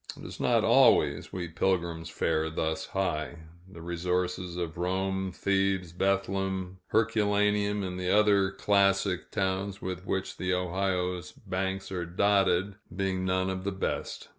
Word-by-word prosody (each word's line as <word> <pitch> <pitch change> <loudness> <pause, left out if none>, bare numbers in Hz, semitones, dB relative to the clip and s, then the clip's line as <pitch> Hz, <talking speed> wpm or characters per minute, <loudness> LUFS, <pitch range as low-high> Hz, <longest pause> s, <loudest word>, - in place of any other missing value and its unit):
It - - -10
is - - -8
not - - +3
always, 70 +1 +4
we 90 -3 -4
pilgrims 85 -1 -1
fare 80 0 0
thus 80 0 -2
high 85 -4 -2 0.4
the 85 -3 -10
resources 90 +1 -2
of 85 -2 -3
Rome, 95 +1 -1
Thebes, 95 -2 0
Bethlehem, 95 0 -1
Herculaneum, 105 -2 +2
and 90 -1 -4
the 90 -1 -2
other 100 -1 +4
classic 100 -1 +1
towns 95 0 -1
with 90 -1 -5
which 95 -1 -2
the 90 0 0
Ohio's 90 -1 -1
banks 95 +1 -3
are 90 -2 -3
dotted, 100 +1 +2 0.2
being 95 -1 -1
none 95 0 +1
of 95 0 -4
the 100 - -1
best. 95 - -4
95 Hz, 140 wpm, -29 LUFS, 90-100 Hz, 0.4 s, always